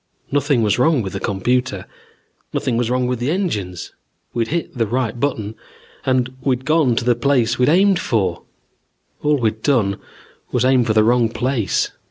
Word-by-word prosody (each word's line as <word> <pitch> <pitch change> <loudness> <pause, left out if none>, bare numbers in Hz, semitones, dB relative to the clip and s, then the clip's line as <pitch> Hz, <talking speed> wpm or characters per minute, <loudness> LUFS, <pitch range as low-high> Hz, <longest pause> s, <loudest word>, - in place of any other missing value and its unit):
Nothing 140 -3 +2
was 105 +2 +1
wrong 140 -2 +3
with 95 - -5
the 95 - -3
computer. 100 0 -1 0.7
Nothing 125 - -1
was 120 0 0
wrong 125 0 +1
with 125 -1 -1
the 125 +3 -1
engines. 105 - -3 0.4
We'd 115 -1 0
hit 165 +1 -3
the 115 -3 0
right 120 +1 -2
button 110 -6 -2 0.5
and 130 -1 +1
we'd 130 -1 -1
gone 155 -5 +3
to 115 - -1
the 125 - +4
place 120 -2 +1
we'd 125 - +4
aimed 190 +3 +4
for. 95 -7 -1 0.8
All 150 0 +2
we'd 110 -3 -1
done 110 -9 +1 0.5
was 125 0 +1
aim 130 -1 +4
for 110 - +1
the 110 0 +4
wrong 120 0 +3
place. 120 -4 -1
125 Hz, 175 wpm, -19 LUFS, 110-135 Hz, 0.8 s, the